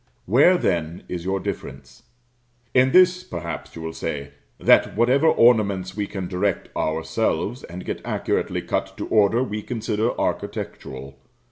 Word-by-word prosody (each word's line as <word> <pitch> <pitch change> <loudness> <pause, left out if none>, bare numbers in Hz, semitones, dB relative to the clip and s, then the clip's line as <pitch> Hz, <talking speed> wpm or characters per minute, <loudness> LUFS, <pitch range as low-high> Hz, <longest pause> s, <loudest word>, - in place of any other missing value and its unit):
Where, 145 - +5
then, 85 - -1
is 90 -1 -5
your 95 +1 0
difference? 70 -6 -7 0.7
In 130 +1 +4
this, 185 +1 +5
perhaps, 85 - -6
you 80 - -7
will 80 0 -5
say; 70 -2 -4 0.3
that - - +4
whatever 130 +7 +4
ornaments 100 - +3
we 105 -1 -2
can 95 -3 -5
direct 95 +1 -2
ourselves, 80 +8 -1
and 90 +2 -9
get - - -4
accurately - - -1
cut - - -3
to - - -4
order, 110 +3 +3
we 105 -3 -4
consider 115 -1 -2
architectural. 70 +1 -4
100 Hz, 140 wpm, -23 LUFS, 85-120 Hz, 0.7 s, Where